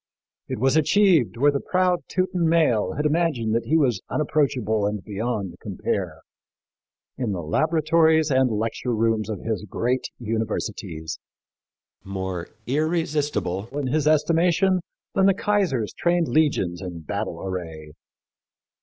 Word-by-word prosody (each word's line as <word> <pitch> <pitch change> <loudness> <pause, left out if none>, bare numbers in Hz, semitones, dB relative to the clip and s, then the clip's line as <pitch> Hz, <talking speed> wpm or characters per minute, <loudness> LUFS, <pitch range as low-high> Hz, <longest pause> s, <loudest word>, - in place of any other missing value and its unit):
It - - -3
was 130 +5 +2
achieved 160 - +3
where 145 +4 +4
the 140 - -1
proud 180 +1 +1
Teuton 180 -2 0
male 125 - +2
had 150 - -2
imagined 150 -8 +1
that 115 - 0
he 160 - +3
was 125 -10 +2
unapproachable 130 -9 +1
and 105 -2 -3
beyond 105 -3 -3
compare 90 -4 -3 1.0
in 120 -6 -1
the 90 -3 -4
laboratories 160 - +2
and 130 -1 +3
lecture 115 +2 -2
rooms 110 -1 +1
of 105 -4 -4
his 110 -2 -3
great 125 +5 -1
universities 105 -7 -4 0.8
more 95 -2 -4 0.2
irresistible, 150 - -1
in 145 - -1
his 150 -1 +1
estimation, 170 +4 +3 0.3
than 195 0 +4
the 195 - +4
Kaiser's 195 - 0
trained 175 -1 +1
legions 100 - +1
in 90 -3 -6
battle 80 - -4
array. 80 -5 -6
125 Hz, 130 wpm, -24 LUFS, 105-160 Hz, 1.0 s, where